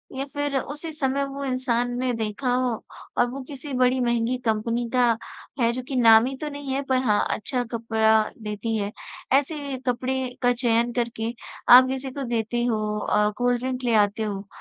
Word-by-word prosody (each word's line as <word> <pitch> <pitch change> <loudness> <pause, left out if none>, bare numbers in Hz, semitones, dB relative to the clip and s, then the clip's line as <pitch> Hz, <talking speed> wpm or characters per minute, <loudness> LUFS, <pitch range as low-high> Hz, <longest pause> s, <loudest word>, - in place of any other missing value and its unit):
या 270 +1 -2
फिर 290 -1 -1
उसी 300 +4 -6
समय 280 -2 -1
वो 275 0 -6
इंसान 245 -2 0
ने 255 -1 0
देखा 225 +3 -2
हो 255 0 +1 0.5
और 245 - +4
वो 270 +2 -6
किसी 280 0 -7
बड़ी 255 0 +3
महँगी 235 +1 +1
कंपनी 230 +2 0
का 240 -3 +3 0.4
है 235 0 +3
जो 255 - -3
कि 270 - -4
नामी 235 +2 +6
तो 300 - -2
नहीं 285 -2 -5
है 275 - 0
पर 260 - +3
हाँ 210 -4 +3 0.2
अच्छा 250 +3 -2
कपड़ा 220 -1 +3 0.2
देती 210 +2 -3
है। 205 0 -2 0.4
ऐसे 280 -1 0
कपड़े 255 +1 -1
का 245 0 +4
चयन 235 -1 +1
करके 235 -1 -2 0.4
आप 255 +1 +10
किसी 265 0 -4
को 275 +1 -5
देते 240 0 -1
हो, 215 -3 -1
अ, 210 0 +2
कोल्ड 245 0 +1
ड्रिंक 255 0 -3
ले 235 -2 +1
आते 210 +2 -5
हो। 200 -1 -4
245 Hz, 185 wpm, -24 LUFS, 230-265 Hz, 0.5 s, आप